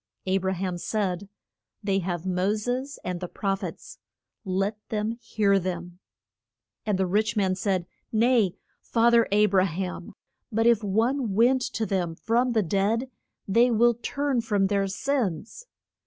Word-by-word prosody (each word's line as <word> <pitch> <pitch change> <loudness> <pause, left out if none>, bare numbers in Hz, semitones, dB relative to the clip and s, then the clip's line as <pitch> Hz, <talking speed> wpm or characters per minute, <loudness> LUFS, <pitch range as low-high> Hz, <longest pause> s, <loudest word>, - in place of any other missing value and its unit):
A 190 +1 +2
bra 190 0 -1
ham 185 -1 -3
said, 200 -1 -2 0.5
They 195 -1 +1
have 175 -2 -3
Mo 185 +3 +1
ses 250 +6 -3
and 180 -1 -3
the 180 - -4
proph 195 +1 -2
ets, - - -8 0.4
let 195 +2 -1
them 215 0 -1
hear 200 -3 +2
them. 175 -1 -5 0.9
And 205 -3 +1
the 190 - +1
rich 210 +4 0
man 190 -2 +2
said, 185 -1 -1 0.3
Nay, 225 -4 +3 0.3
fa 235 0 +3
ther 235 -1 +5
A 210 +1 +5
bra 190 -2 +3
ham; 180 +1 -4 0.4
but 225 +1 +1
if 235 -2 +4
one 225 +2 0
went 250 +4 +4
to 225 - -1
them 180 -5 -1
from 240 +6 +1
the 220 -2 +2
dead 205 +8 0 0.4
they 235 +5 +4
will 240 +1 +4
turn 270 +2 -1
from 205 -3 +1
their 200 -1 +1
sins. 230 - -2
205 Hz, 155 wpm, -26 LUFS, 190-230 Hz, 0.9 s, ther